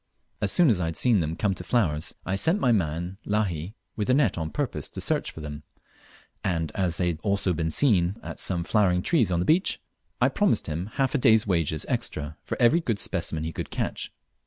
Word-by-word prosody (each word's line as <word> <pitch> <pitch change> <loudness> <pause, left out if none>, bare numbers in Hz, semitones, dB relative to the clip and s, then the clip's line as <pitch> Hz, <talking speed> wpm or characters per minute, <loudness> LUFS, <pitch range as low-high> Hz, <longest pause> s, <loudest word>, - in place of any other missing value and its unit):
As 100 -2 +2
soon 170 -7 +5
as 95 -5 +1
I - - 0
had 80 0 -3
seen 120 -5 +3
them 80 -1 -1
come 100 +1 0
to - - -7
flowers, 85 -10 0
I 95 - -2
sent 165 - +2
my 125 - +3
man 90 -1 -1
Lahi 100 -3 -1 0.2
with 105 +1 -2
a 130 - +5
net 135 -8 +3
on 80 -2 -3
purpose - - -3
to - - -7
search - - 0
for 80 - -10
them, 75 0 -7 0.8
as 85 0 -1
they 90 - +1
had 80 -2 -3
also 100 -2 +1
been 80 0 -1
seen 95 - +2
at - - -7
some 90 -3 0
flowering 90 -2 +2
trees 125 - +2
on 85 - +1
the 90 - 0
beach, 170 +4 +3 0.4
and - - +4
I - - +4
promised - - +1
him 80 +4 -3
half 135 -1 0
a 145 - +2
day's 110 -3 +5
wages 85 -5 0
extra 75 0 -3
for - - -5
every 125 +7 +5
good 115 -11 -1
specimen 80 -4 -2
he 80 0 -4
could - - -5
catch. - - -3
95 Hz, 220 wpm, -26 LUFS, 80-110 Hz, 0.8 s, soon